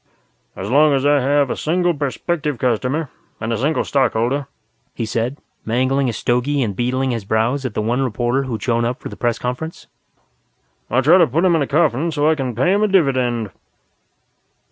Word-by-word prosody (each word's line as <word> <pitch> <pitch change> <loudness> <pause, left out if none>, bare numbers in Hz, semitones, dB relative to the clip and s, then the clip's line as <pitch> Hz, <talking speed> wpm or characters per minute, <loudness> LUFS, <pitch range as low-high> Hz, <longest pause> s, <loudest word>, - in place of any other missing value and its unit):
"As 95 - -5
long 145 +4 +4
as 135 +1 0
I 145 0 +4
have 140 0 +2
a - - -1
single 175 +2 0
prospective 145 +1 -2
customer, 125 +5 -1 0.3
and 115 +1 -2
a - - -1
single 150 +5 +1
Stockholder," 135 +1 0 0.5
he 115 - -2
said, 115 +5 -2 0.3
mangling 130 +3 +1
a - - -2
stogie 125 +6 0
and 105 -4 -3
beetling 130 +4 0
his 115 -3 -3
brows 115 +7 0
at 110 - -10
the 105 - -1
one 120 +4 0
reporter 125 +2 0
who'd 115 -5 -4
showed 120 -2 +1
up 120 +4 -2
for - - -7
the - - -9
press 120 -2 -1
conference, 125 +7 -5 1.0
"I'll 130 +3 +2
try 170 +7 +6
to 170 - +5
put 165 +9 +1
him 175 -2 +4
in 160 - +1
a 140 - 0
coffin 155 0 +1
so 150 -1 +1
I 160 - +5
can 130 -6 -3
pay 155 - +2
him 205 - +1
a 215 - +3
dividend." 130 - +1
130 Hz, 195 wpm, -19 LUFS, 120-145 Hz, 1.0 s, try